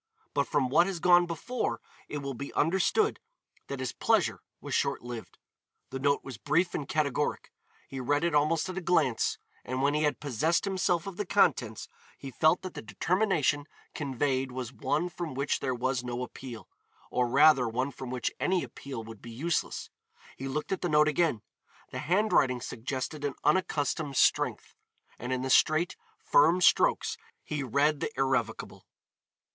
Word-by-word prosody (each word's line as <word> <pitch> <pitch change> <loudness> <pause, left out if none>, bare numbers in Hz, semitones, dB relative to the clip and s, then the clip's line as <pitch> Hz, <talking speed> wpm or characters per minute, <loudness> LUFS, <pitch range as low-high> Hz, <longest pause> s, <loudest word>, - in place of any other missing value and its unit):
But 140 -1 +1
from 140 -4 +1
what 170 +7 +4
has 190 -3 -3
gone 175 0 +5
before 165 - -3 0.3
it 145 -1 -4
will 140 0 -3
be 140 +3 -6
understood 190 - +2 0.5
that 140 - -5
his 130 -3 -2
pleasure - - +1 0.2
was - - -6
short - - 0
lived. 120 -2 -8 0.5
The 135 - -4
note 140 +1 +1
was 130 -5 -8
brief 170 +5 +1
and 140 - -4
categoric, 150 -1 -1 0.4
he 135 - -6
read 145 +4 +1
it 170 -2 +1
almost 155 +4 +2
at 185 0 -4
a - - -9
glance, 150 -9 +1 0.3
and 130 +2 -3
when 140 +1 +3
he 150 - +1
had 150 -1 +1
possessed 150 - 0
himself 185 -3 0
of 195 -2 -7
the 205 - -2
contents 135 - +2 0.3
he 135 - -8
felt 155 +7 +3
that 185 - -6
the - - -6
determination 150 - +1 0.3
conveyed 135 -2 -1
was 125 -1 -5
one 150 +7 -1
from 170 -4 -6
which 140 +1 0
there 130 -2 -1
was 125 +1 -1
no 125 0 -3
appeal, 125 -3 -9 0.4
or 125 -1 +1
rather 140 0 +5
one 130 +5 -1
from 130 -2 -8
which 125 -1 -2
any 185 -1 +1
appeal 130 -5 -7
would 110 -2 -11
be 120 - -10
useless. 155 +9 -2 0.4
He 135 - -6
looked 150 +6 -3
at 190 - -1
the 175 - -1
note 150 0 +5
again. 150 -7 +1 0.5
The - - -4
handwriting 175 -9 +2
suggested 130 +5 -4
an 145 -2 -2
unaccustomed 150 -3 0
strength, - - +2 0.5
and 125 +2 -5
in 130 0 -1
the 130 - -1
straight, 155 +6 +4 0.2
firm 160 +5 +4
strokes 180 - +3 0.3
he 150 -1 -3
read 140 +4 +2
the - - -2
irrevocable. 135 -1 -1
145 Hz, 170 wpm, -29 LUFS, 130-165 Hz, 0.5 s, gone